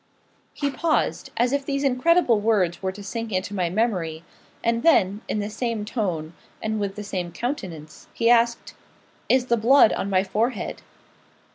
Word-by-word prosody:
He 285 -1 -1
paused, 325 +3 0
as 245 +2 +2
if 280 0 0
these 275 0 -2
incredible 270 -2 +3
words 205 -5 +1
were 190 -1 -1
to 200 +2 -10
sink 225 +2 -5
into 185 +2 -2
my 180 -4 0
memory; 175 -6 -1 0.4
and 230 0 +1
then, 205 - +3
in - - -1
the 205 0 -2
same 225 -1 -2
tone, 175 -9 -3 0.3
and 220 0 -2
with 200 -1 -3
the 210 - -6
same 180 -4 -4
countenance, 175 - -6
he 230 - 0
asked 235 0 +3 0.6
'Is 260 -1 +4
the 235 -1 +2
blood 240 +2 +5
on 200 - -2
my 190 -1 +3
forehead?' 220 +4 -2
220 Hz, 165 wpm, -24 LUFS, 190-245 Hz, 0.6 s, blood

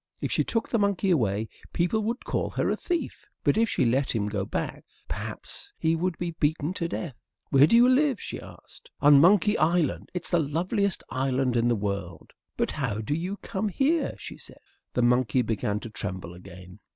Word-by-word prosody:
If - - -3
she - - +2
took 230 - -1
the 230 - 0
monkey 200 -1 +1
away, 110 - +1 0.3
people 180 +6 +1
would 235 +3 -3
call - - -1
her - - 0
a - - +1
thief. 345 -2 -3 0.2
But - - +3
if 225 0 +2
she 130 - +1
let 130 +2 +1
him 105 -2 0
go 100 -2 -2
back, - - -4 0.2
perhaps - - -6
he 160 0 +1
would 175 +1 -1
be 175 -1 -3
beaten 155 +1 0
to 170 - -2
death. 170 -3 -4 0.4
"Where 140 +1 +7
do 230 - +4
you 240 +1 +7
live?" 260 -2 +3
she - - -6
asked. - - -14
"On 145 -1 +7
Monkey 205 +4 +5
Island; 165 0 +1
it's 175 -3 -3
the 175 - +4
loveliest 175 +6 0
island 130 -1 0
in 120 0 +2
the 120 - +3
world." 100 -5 -4 0.3
"But - - 0
how 130 -8 -2
did 110 +8 -2
you 185 +4 -3
come 215 -1 -2
here?" 285 - +1
she - - -9
said. - - -15 0.3
The 125 - +1
monkey 125 0 +3
began 105 -2 -1
to 115 - -7
tremble 95 -4 -5
again. 90 0 -12
150 Hz, 200 wpm, -27 LUFS, 115-190 Hz, 0.4 s, Where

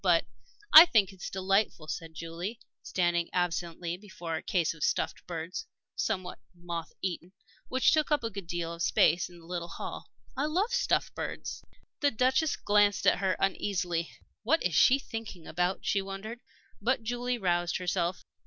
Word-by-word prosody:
But 175 -3 +4 0.3
" - - -29
"I 325 +3 +13
think 205 - +3
it's 185 - -7
delightful," 195 -4 0
said 160 0 -6
Julie, 170 +7 -5 0.2
standing 175 -2 0
absently 175 -1 -1
before 185 -5 -6
a - - -3
case 170 -4 0
of 165 - -7
stuffed - - -1
birds, 170 - -5 0.3
somewhat 185 -5 -2 0.2
moth 170 -1 -5
eaten, 180 -1 -4 0.3
which 260 0 +3
took 310 -1 +2
up 300 -4 +2
a 230 - -2
good 195 -3 -7
deal 170 -1 -3
of 170 - -8
space 170 +1 +3
in 175 - -14
the 165 - -15
little 170 0 -4
hall. 170 - -7 0.3
"I 275 - 0
love 385 +10 0
stuffed - - +1
birds." - - -5 0.4
The 290 - +3
Duchess 260 +6 +2
glanced 205 0 +3
at - - +4
her 190 -2 +1
uneasily. 180 -3 -1 0.3
"What 305 +9 +2
is 180 - 0
she 250 - +6
thinking 225 -9 -7
about?" 180 +3 -1
she 200 - +1
wondered. 195 +4 -7 0.4
But 250 +2 +1
Julie 245 +2 -1
roused 175 -4 0
herself. 180 0 -1
185 Hz, 170 wpm, -30 LUFS, 170-225 Hz, 0.4 s, I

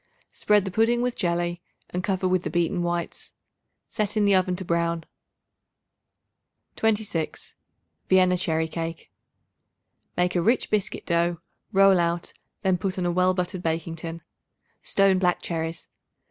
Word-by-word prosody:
Spread 210 -2 +2
the 190 - -3
pudding 230 +4 +2
with 250 -1 -1
jelly 175 -1 -1 0.3
and 180 +1 -2
cover 190 -1 0
with 185 -1 +2
the - - -4
beaten 175 +1 0
whites; 175 0 -3 0.5
set 215 0 -2
in 210 - +3
the 200 - +4
oven 185 -1 +3
to 185 - -6
brown. 170 -1 0 1.7
26. 210 -7 -1 0.6
Vienna 185 -1 +5
Cherry 160 -2 0
Cake. 165 0 -5 1.1
Make 180 +1 +1
a 175 - +3
rich 230 +7 +1
biscuit 210 -1 -1
dough; 170 0 +1 0.3
roll 195 -2 +6
out; 170 0 -1 0.3
then 190 -2 +2
put 190 +1 -2
on 180 - -1
a 175 - +1
well 185 +1 +2
buttered 180 0 -2
baking 165 0 -2
tin. 165 +1 -7 0.6
Stone 195 -1 +3
black 180 -1 +2
cherries. 165 -1 -4
180 Hz, 145 wpm, -25 LUFS, 170-195 Hz, 1.7 s, roll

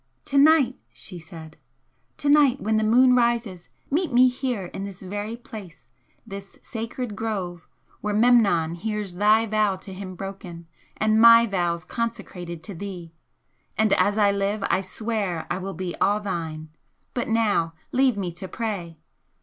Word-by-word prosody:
"To 280 - -1
night!" 280 -4 +5
she 180 -3 -9
said 160 -1 -12 0.6
"To 290 - -2
night, 285 -3 +5
when 220 +1 0
the 215 - +1
moon 250 +3 +5
rises, 235 -7 0 0.2
meet 330 +3 0
me 255 +1 +6
here 250 -6 -3
in 195 +2 -7
this 195 -2 -7
very 205 +4 -5
place, 215 -8 -11 0.4
this 195 0 -9
sacred 230 -1 -5
grove 190 -6 -4 0.3
where 210 - -2
Memnon 210 -8 +4
hears 210 +1 -4
thy 210 +4 +4
vows 210 -3 0
to 195 - -8
him 185 -1 -7
broken, 185 -3 -8 0.3
and 215 +1 +3
my 230 0 +9
vows 175 -5 -1
consecrated 190 -8 -5
to 200 - -7
thee! 180 -2 -7 0.6
and 220 -1 +3
as 205 +1 +2
I 205 -2 +4
live 200 +1 -1
I 190 - +2
swear 195 -4 -3
I 185 - -1
will 195 0 -5
be 180 0 -4
all 205 +1 +2
thine! 160 -6 -5 0.4
But 245 - -2
now 210 -8 +1 0.2
leave 260 -3 +3
me 185 -3 -2
to 175 +3 -7
pray!" 185 -7 -4
205 Hz, 160 wpm, -24 LUFS, 180-230 Hz, 0.6 s, my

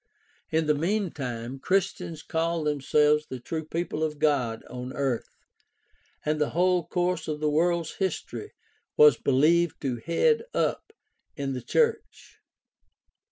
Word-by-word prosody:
In 160 0 +1
the 150 - +3
meantime 145 - -2
Christians 175 -2 -1
called 165 -1 -1
themselves 150 +1 +2
the 130 - -6
true 160 +6 -4
people 160 0 -3
of 155 -1 -2
God 135 -7 +1
on 125 +1 -6
earth, 135 -4 -1 1.0
and 150 0 0
the 150 - +2
whole 180 -1 +3
course 175 -2 -1
of 150 -1 -3
the 150 0 +1
world's 170 +1 +1
history 195 - -3 0.4
was 455 -1 +8
believed 160 +5 +3
to 130 -4 -1
head 170 - +2
up - - -1 0.4
in 140 -3 -3
the 125 - -4
church. 460 - -1
155 Hz, 130 wpm, -27 LUFS, 140-175 Hz, 1.0 s, was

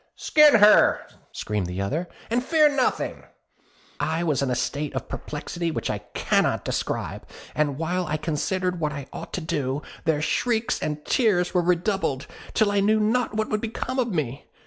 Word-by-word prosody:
'Skin 300 -3 +5
her!' 210 -1 +6 0.3
screamed 105 -4 -3
the 90 +1 -5
other, 150 - -2 0.2
'and 245 +2 +1
fear 305 +2 +4
nothing.' 280 -3 0 0.8
I 160 +3 0
was 150 -6 +1
in 135 - 0
a 125 - +1
state 140 +5 -2
of - - -3
perplexity 165 +3 -4
which 160 - -2
I 105 - -3 0.2
cannot - - +1
describe; - - -3 0.3
and 145 -3 0
while 175 +2 -1
I 155 0 -1
considered 180 +4 -1
what 155 -2 -1
I 140 -2 -6
ought - - -7
to 180 - -2
do, 145 -3 -2 0.2
their 160 -2 +2
shrieks 225 +7 0
and 150 0 -3
tears 200 -8 +2
were 180 - +3
redoubled, 175 -5 0 0.3
till 215 -3 +3
I 205 - +2
knew 215 +2 +3
not 225 +1 +1
what 220 0 -1
would 215 0 -1
become 245 +3 -3
of 245 - +2
me. 145 - -3
175 Hz, 175 wpm, -25 LUFS, 150-215 Hz, 0.8 s, her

